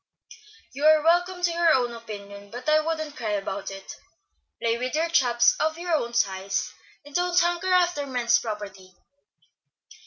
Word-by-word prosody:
"You 280 Hz, +3 st, -6 dB
are 310 Hz, -1 st, +5 dB
welcome 355 Hz, +2 st, +2 dB
to 350 Hz, -, +3 dB
your 315 Hz, -8 st, +2 dB
opinion, 205 Hz, -3 st, -10 dB
but 245 Hz, +6 st, -9 dB
I 305 Hz, 0 st, +5 dB
wouldn't 315 Hz, -1 st, -3 dB
cry 215 Hz, -3 st, -3 dB
about 195 Hz, -1 st, -4 dB
it. 195 Hz, 0 st, -9 dB, 0.6 s
Play 230 Hz, 0 st, 0 dB
with 250 Hz, +3 st, -3 dB, 0.2 s
chaps 240 Hz, -4 st, +4 dB
of 315 Hz, +1 st, 0 dB
your 345 Hz, 0 st, -3 dB
own 235 Hz, -6 st, -1 dB
size 195 Hz, -4 st, -1 dB, 0.3 s
and 290 Hz, -, -14 dB
don't 355 Hz, +1 st, +2 dB
hanker 350 Hz, +2 st, 0 dB
after 350 Hz, -5 st, +2 dB
men's 245 Hz, -3 st, +2 dB
property. 200 Hz, -4 st, -7 dB
255 Hz, 150 wpm, -25 LUFS, 210-330 Hz, 0.6 s, are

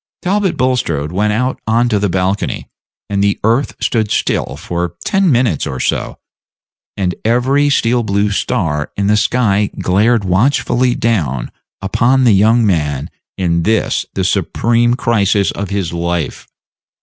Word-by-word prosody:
Talbot 195 Hz, 0 st, 0 dB
Bulstrode 85 Hz, -, 0 dB
went 105 Hz, +4 st, 0 dB
out 125 Hz, +5 st, -1 dB
on 115 Hz, +2 st, +2 dB
to 105 Hz, -3 st, +1 dB
the 100 Hz, 0 st, 0 dB
balcony, 95 Hz, +2 st, -2 dB, 0.4 s
and 100 Hz, -1 st, -1 dB
the 100 Hz, 0 st, +1 dB
earth 115 Hz, +6 st, +1 dB
stood 110 Hz, -3 st, 0 dB
still -, -, -1 dB
for 85 Hz, 0 st, -4 dB
ten 195 Hz, -4 st, +2 dB
minutes 120 Hz, -, +1 dB
or 65 Hz, -, -5 dB
so, -, -, -2 dB, 0.8 s
and 90 Hz, -3 st, 0 dB
every 130 Hz, +5 st, +2 dB
steel 120 Hz, -3 st, +2 dB
blue 100 Hz, -1 st, 0 dB
star 75 Hz, -7 st, -1 dB
in 100 Hz, -, 0 dB
the 105 Hz, +1 st, +3 dB
sky 105 Hz, -2 st, +1 dB
glared 105 Hz, +4 st, +2 dB
watchfully 120 Hz, +5 st, +1 dB
down 75 Hz, -, -1 dB, 0.3 s
upon 125 Hz, +7 st, +2 dB
the 120 Hz, -4 st, +5 dB
young 110 Hz, +4 st, +4 dB
man 75 Hz, -8 st, -1 dB, 0.3 s
in 85 Hz, -3 st, 0 dB
this 110 Hz, +5 st, 0 dB
the 95 Hz, -, 0 dB
supreme 115 Hz, +6 st, +1 dB
crisis 105 Hz, -5 st, +1 dB
of 100 Hz, 0 st, -5 dB
his 100 Hz, -4 st, -2 dB
life. 85 Hz, -1 st, -3 dB
105 Hz, 145 wpm, -15 LUFS, 90-120 Hz, 0.8 s, the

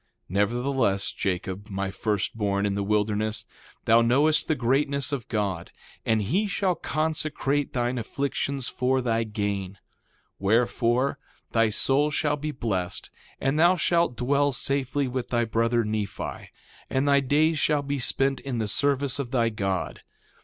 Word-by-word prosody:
2:2 -, -, -47 dB
Nevertheless, 110 Hz, +1 st, +1 dB
Jacob, 95 Hz, +2 st, -3 dB
my 100 Hz, -1 st, -3 dB
first 105 Hz, +1 st, -1 dB
born 100 Hz, -2 st, 0 dB
in 100 Hz, -, 0 dB
the 100 Hz, -, -1 dB
wilderness, 105 Hz, +1 st, 0 dB, 0.4 s
thou 115 Hz, +1 st, +6 dB
knowest 140 Hz, +7 st, +3 dB
the 155 Hz, -, +2 dB
greatness 140 Hz, +3 st, +1 dB
of 135 Hz, -6 st, -3 dB
God; 100 Hz, -6 st, -2 dB, 0.4 s
and 110 Hz, -1 st, +2 dB
he 185 Hz, -, +1 dB
shall 195 Hz, -2 st, +1 dB
consecrate 155 Hz, -3 st, -1 dB
thine 120 Hz, 0 st, 0 dB
afflictions 135 Hz, +2 st, -2 dB
for 130 Hz, +1 st, 0 dB
thy 115 Hz, -2 st, 0 dB
gain. 100 Hz, -3 st, -3 dB
2:3 -, -, -23 dB, 0.6 s
Wherefore, 120 Hz, +5 st, +1 dB, 0.3 s
thy 115 Hz, -1 st, +3 dB
soul 135 Hz, +7 st, +2 dB
shall 150 Hz, 0 st, 0 dB
be 150 Hz, +1 st, -4 dB
blessed, 105 Hz, -10 st, -3 dB, 0.3 s
and 135 Hz, +3 st, 0 dB
thou 175 Hz, +3 st, +6 dB
shalt 170 Hz, -6 st, +1 dB
dwell 140 Hz, +3 st, +2 dB
safely 135 Hz, +1 st, -1 dB
with 125 Hz, -1 st, -4 dB
thy 120 Hz, -1 st, +1 dB
brother, 115 Hz, +1 st, +1 dB
Nephi; 105 Hz, -1 st, -4 dB, 0.4 s
and 130 Hz, +2 st, 0 dB
thy 140 Hz, 0 st, +5 dB
days 150 Hz, +4 st, +2 dB
shall 150 Hz, -1 st, +2 dB
be 140 Hz, 0 st, -2 dB
spent 135 Hz, +2 st, +1 dB
in 135 Hz, -3 st, -4 dB
the 110 Hz, -2 st, -1 dB
service 140 Hz, +3 st, +1 dB
of 135 Hz, -4 st, -3 dB
thy 120 Hz, -3 st, +2 dB
God. 95 Hz, -4 st, -2 dB
125 Hz, 155 wpm, -26 LUFS, 105-140 Hz, 0.6 s, thou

